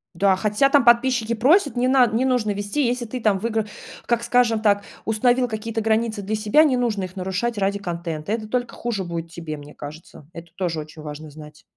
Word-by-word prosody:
Да, 195 +1 +3
хотя 210 +7 +2
там 280 -2 +4
подписчики 235 -1 +3
просят 285 - +3
не 250 +1 +2
над 255 -4 +4
не 245 +4 +1
нужно 245 -5 +1
вести, 205 +8 -1
если 240 0 -1
ты 245 +2 -6
там 210 -3 +2
выигра 220 +1 -1 0.4
как, 235 -1 +1
скажем 235 -2 +2
так, 205 -2 +2 0.2
установил 245 +3 +2
какие-то 225 0 -3
границы 220 -1 0
для 215 +3 -2
себя, 215 +9 +4
не 265 -5 +2
нужно 220 -6 0
их 185 +1 -7
нарушать 190 +5 -2
ради 200 +1 +1
контента. 170 -1 -5
Это 220 -1 -2
только 245 +1 -2
хуже 225 -5 -3
будет 170 -1 -5
тебе, 165 -3 -6
мне 145 0 -12
кажется, 150 0 -11
это 170 0 -9
тоже 170 -4 -2
очень 155 0 -9
важно 150 +1 -8
знать. 150 +1 -13
215 Hz, 205 wpm, -22 LUFS, 180-240 Hz, 0.4 s, там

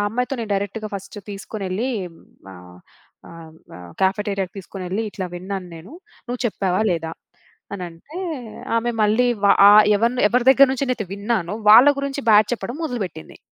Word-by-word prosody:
అమ్మాయితో 250 +4 -2
నేను 220 - -6
డైరెక్ట్‌గా 205 +2 -4
ఫస్ట్ 195 +2 -8
తీసుకొనెళ్ళి, 200 +3 -4 0.6
ఆహ్, 90 0 -14 0.5
ఆహ్, 165 -1 -12 0.5
కెఫెటేరియాకి 195 -1 -1
తీసుకొనెళ్ళి, 190 +2 -5
ఇట్లా 185 -2 -5
విన్నాను 185 0 -6
నేను. 175 - -13 0.3
నువ్వు 245 0 -5
చెప్పావా, 190 -1 -1
లేదా 165 -1 -4 0.6
అనంటే 180 - -9 0.6
ఆమె 240 +1 0
మళ్ళీ 215 +4 +3 0.2
వ - - +6 0.2
ఆహ్, 210 +1 +8
ఎవరిని 235 +4 0
ఎవరి 245 +2 +1
దగ్గర 270 +1 +7
నుంచి 270 +1 -2
నేను 235 -4 -2
విన్నానో 205 -3 -2 0.2
వాళ్ళ 245 +6 +9
గురించి 280 0 -3
బ్యాడ్ 210 0 +6
చెప్పడం 245 +2 -4
మొదలుబెట్టింది. 195 - -6
205 Hz, 140 wpm, -21 LUFS, 185-240 Hz, 0.6 s, వాళ్ళ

